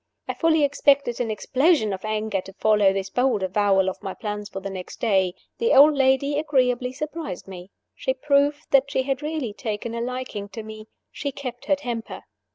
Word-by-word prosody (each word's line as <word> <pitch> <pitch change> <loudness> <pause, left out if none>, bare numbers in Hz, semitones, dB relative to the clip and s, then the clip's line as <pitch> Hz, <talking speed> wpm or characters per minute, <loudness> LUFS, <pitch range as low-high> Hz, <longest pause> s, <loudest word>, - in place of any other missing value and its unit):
I - - -2
fully 320 -2 +2
expected 280 -3 +2
an 235 - -1
explosion 260 - +2
of 190 - -6
anger 215 -2 -1
to 195 - -12
follow 210 -1 +3
this 195 0 -3
bold 245 -5 +1
avowal 195 0 +2
of 190 - -3
my 195 -2 -5
plans 210 -2 -5
for 195 - -6
the 195 0 -6
next 185 -1 -8
day. 190 -5 +2 0.2
The 465 +1 +2
old 295 +3 +8
lady 275 +1 +2
agreeably 255 -4 +1
surprised 300 - -6
me. 185 -1 -9 0.2
She 260 - -2
proved 285 +2 +1
that 275 0 +4
she 265 -2 0
had 270 +1 -2
really 300 -7 -3
taken 220 +1 -4
a 235 - -3
liking 245 -5 -4
to 225 - -4
me: 215 0 -10 0.2
she 285 - -4
kept 260 -1 -7
her 290 - +3
temper. 240 -5 -6
245 Hz, 190 wpm, -24 LUFS, 205-280 Hz, 0.2 s, old